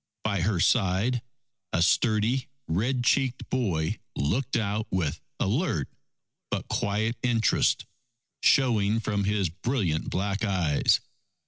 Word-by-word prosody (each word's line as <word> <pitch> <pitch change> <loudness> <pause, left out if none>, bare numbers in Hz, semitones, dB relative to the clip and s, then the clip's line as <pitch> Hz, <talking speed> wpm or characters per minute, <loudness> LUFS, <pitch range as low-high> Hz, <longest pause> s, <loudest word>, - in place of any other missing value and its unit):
By 100 -4 0
her 95 0 +1
side 110 +5 +2 0.5
a 85 - +2
sturdy 110 +6 +2 0.2
red 120 +9 0
cheeked 130 0 +1
boy 95 -12 0 0.2
looked 120 - 0
out 105 0 -1
with 85 -6 -1 0.2
alert 100 - 0 0.6
but - - -3
quiet 110 +3 0
interest 115 -4 +2 0.6
showing 110 -5 +3
from 105 -2 -1
his 100 -3 +1
brilliant 95 - -1
black 100 +2 -2
eyes. 90 -8 +2
105 Hz, 110 wpm, -27 LUFS, 95-120 Hz, 0.6 s, showing